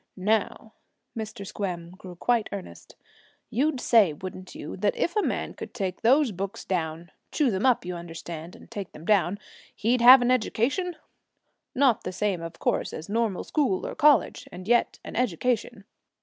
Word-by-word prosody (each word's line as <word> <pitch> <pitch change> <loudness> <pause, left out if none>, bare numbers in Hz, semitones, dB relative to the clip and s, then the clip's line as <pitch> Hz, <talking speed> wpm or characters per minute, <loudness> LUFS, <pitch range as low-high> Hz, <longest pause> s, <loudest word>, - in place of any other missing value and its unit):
Now,' 215 +2 -1 0.4
Mr. 215 -3 -6
Squem 175 -4 -4
grew 185 -1 -11
quite 230 +5 +1
earnest, 200 -2 -9 0.6
'you'd 270 +4 +1
say, 215 -10 +4
wouldn't 185 +3 -9
you, - - -7
that 205 +2 +1
if 345 - -1
a 425 - +3
man - - -2
could - - -9
take 190 -5 -3
those 265 +2 +4
books 195 +1 -5
down, 165 -2 -3 0.2
chew 285 -6 +2
them 200 +6 +1
up, 245 -1 +3
you 180 0 -4
understand, 170 0 -8
and - - -16
take 200 -3 -6
them 155 - -11
down, 200 -1 +2 0.4
he'd 235 +3 +1
have 250 +1 +9
an 245 - +2
education? 265 - 0 0.8
Not 260 -4 +3
the 185 - -4
same, 185 -2 -1
of 165 0 -7
course, - - -1
as 160 +5 -7
normal 220 -3 0
school 270 -12 0
or - - -4
college, 300 -2 +3
and 180 +2 -9
yet 240 +1 +2
an - - -8
education.' 230 -1 -1
205 Hz, 170 wpm, -26 LUFS, 180-245 Hz, 0.8 s, have